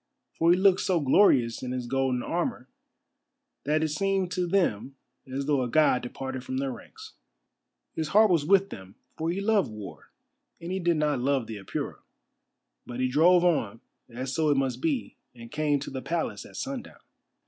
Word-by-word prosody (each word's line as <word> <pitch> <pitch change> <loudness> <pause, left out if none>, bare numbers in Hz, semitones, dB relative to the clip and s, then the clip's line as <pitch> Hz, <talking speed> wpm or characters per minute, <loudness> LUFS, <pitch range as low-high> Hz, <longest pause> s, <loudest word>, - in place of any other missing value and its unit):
For 165 - +2
he 175 - +6
looked 190 -1 +4
so 180 -3 +1
glorious 130 - +3
in 125 -1 -4
his 125 -1 -3
golden 130 -1 0
armour - - -2 1.0
that 155 +2 +1
it 160 - 0
seemed 190 +3 0
to 180 -1 -1
them 140 - 0 0.4
as 135 +1 -3
though 145 -2 +1
a 125 - -2
god 150 -3 +3
departed 130 +1 -6
from 130 0 -4
their 135 0 -1
ranks. - - -11 0.8
His 160 - -2
heart 210 +5 +5
was 165 -4 +3
with 195 +4 +3
them, 95 0 -10 0.2
for 160 +1 -2
he 180 +3 -1
loved 200 - +2
war, 105 -2 -10 0.5
and 170 +2 -6
he 190 - -1
did 175 -2 +1
not 150 -3 +1
love 135 -1 +1
the 110 -1 -7
Apura. 95 - -5 0.8
But 120 0 -8
he 130 0 +1
drove 175 +6 +5
on, 125 - +1 0.3
as 130 +2 -5
so 160 -2 +1
it 145 - +3
must 135 -2 -1
be, 300 -6 -2 0.2
and 115 -1 -12
came 150 -1 +1
to - - -6
the 130 -1 -5
Palace 170 +3 -3
at - - -16
sundown. 270 -2 -6
150 Hz, 185 wpm, -27 LUFS, 130-180 Hz, 1.0 s, he